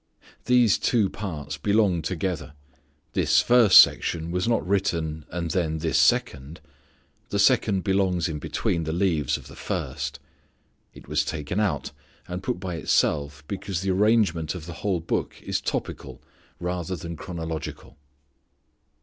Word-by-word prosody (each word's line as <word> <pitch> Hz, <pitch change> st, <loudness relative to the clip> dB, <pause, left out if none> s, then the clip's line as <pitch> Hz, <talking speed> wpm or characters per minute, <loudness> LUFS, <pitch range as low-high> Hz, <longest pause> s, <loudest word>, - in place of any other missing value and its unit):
These 125 Hz, -4 st, +4 dB
two 110 Hz, -6 st, +2 dB
parts 80 Hz, -8 st, -5 dB
belong 100 Hz, -5 st, +2 dB
together. 85 Hz, -2 st, -3 dB, 0.6 s
This -, -, +3 dB
first 120 Hz, -5 st, +6 dB
section 85 Hz, 0 st, +5 dB
was 90 Hz, +4 st, -1 dB
not 115 Hz, -5 st, +1 dB
written, 85 Hz, -6 st, -1 dB
and 85 Hz, -2 st, -3 dB
then 80 Hz, -3 st, 0 dB
this 80 Hz, 0 st, +1 dB
second. 85 Hz, -, +1 dB, 0.7 s
The 100 Hz, -, -1 dB
second 100 Hz, -3 st, +3 dB
belongs 95 Hz, -3 st, +1 dB
in 80 Hz, -3 st, -4 dB
between 85 Hz, +3 st, -1 dB
the 80 Hz, -, -2 dB
leaves 85 Hz, -6 st, +1 dB
of -, -, -13 dB
the -, -, -12 dB
first. 75 Hz, +2 st, -4 dB, 0.7 s
It -, -, -15 dB
was -, -, +1 dB
taken 80 Hz, +5 st, -3 dB
out 80 Hz, -11 st, -1 dB, 0.4 s
and 90 Hz, +1 st, -5 dB
put 90 Hz, -, -3 dB
by 90 Hz, -3 st, -4 dB
itself 75 Hz, -1 st, 0 dB
because 95 Hz, -2 st, -4 dB
the 95 Hz, 0 st, 0 dB
arrangement 95 Hz, -5 st, +2 dB
of 85 Hz, -4 st, -7 dB
the 85 Hz, -, -7 dB
whole 95 Hz, -4 st, 0 dB
Book 85 Hz, -, -3 dB
is -, -, -2 dB
topical -, -, -4 dB, 0.4 s
rather 90 Hz, +1 st, -3 dB
than 85 Hz, 0 st, -6 dB
chronological. 80 Hz, -3 st, -6 dB
90 Hz, 140 wpm, -25 LUFS, 80-100 Hz, 0.7 s, first